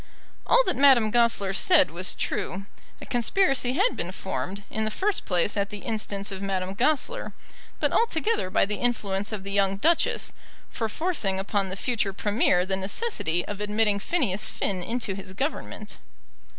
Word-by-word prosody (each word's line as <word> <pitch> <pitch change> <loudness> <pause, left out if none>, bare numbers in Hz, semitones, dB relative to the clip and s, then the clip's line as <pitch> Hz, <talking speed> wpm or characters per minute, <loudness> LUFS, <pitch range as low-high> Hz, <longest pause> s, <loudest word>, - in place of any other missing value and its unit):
All - - +5
that - - 0
Madame 260 -6 +5
Goesler 230 -5 +2
said 295 - +4
was 180 +3 -2
true. 195 +1 -3 0.3
A - - -9
conspiracy 255 0 +1
had 400 - +2
been - - -3
formed, 200 +2 -5
in 220 - -1
the 215 - 0
first 390 - 0
place 180 +2 +1
at 200 -1 0
the 205 -1 -7
instance 210 -3 -2
of 190 0 -6
Madame 190 -1 -2
Goesler, 305 - 0 0.5
but - - 0
altogether 445 - +1
by 185 - +3
the 210 +1 -3
influence 205 -4 -1
of 210 -3 -5
the 200 - -5
young 195 -1 +2
Duchess, 330 +11 +1 0.4
for 225 -2 -2
forcing 220 - 0
upon 195 0 -1
the 185 - -4
future 215 -2 -1
Premier 200 -3 +2
the 190 0 0
necessity 190 - -1
of 205 0 -6
admitting 210 0 +2
Phineas 215 - 0
Finn 190 -2 -3
into 230 +1 -3
his 190 -1 -8
Government. 280 +10 -4
210 Hz, 165 wpm, -26 LUFS, 195-255 Hz, 0.5 s, All